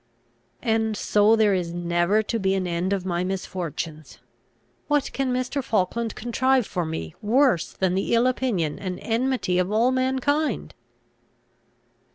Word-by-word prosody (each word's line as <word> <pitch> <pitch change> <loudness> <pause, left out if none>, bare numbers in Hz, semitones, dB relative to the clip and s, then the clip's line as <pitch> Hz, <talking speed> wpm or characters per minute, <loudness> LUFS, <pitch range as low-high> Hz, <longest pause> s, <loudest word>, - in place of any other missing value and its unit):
'" - - -42 0.2
"And 220 -2 +1
so 210 +2 +4
there 215 -2 +3
is 175 -2 -1
never 175 +4 +1
to 230 +2 -2
be 190 -1 +1
an 190 -1 -1
end 175 +2 -1
of 195 -2 -1
my 175 -1 -1
misfortunes! 170 -4 -5 0.7
What 295 -2 0
can 270 -2 -1
Mr. 255 +2 -1
Falkland 225 0 -1
contrive 255 +2 +1
for 175 -4 -3
me 80 - -5
worse 240 - +2
than 190 -1 0
the 195 +5 +1
ill 230 +1 +3
opinion 235 - 0
and 185 -2 -4
enmity 230 -5 0
of 180 +2 0
all 230 +4 +3
mankind?" 265 +4 0
210 Hz, 150 wpm, -24 LUFS, 180-250 Hz, 0.7 s, so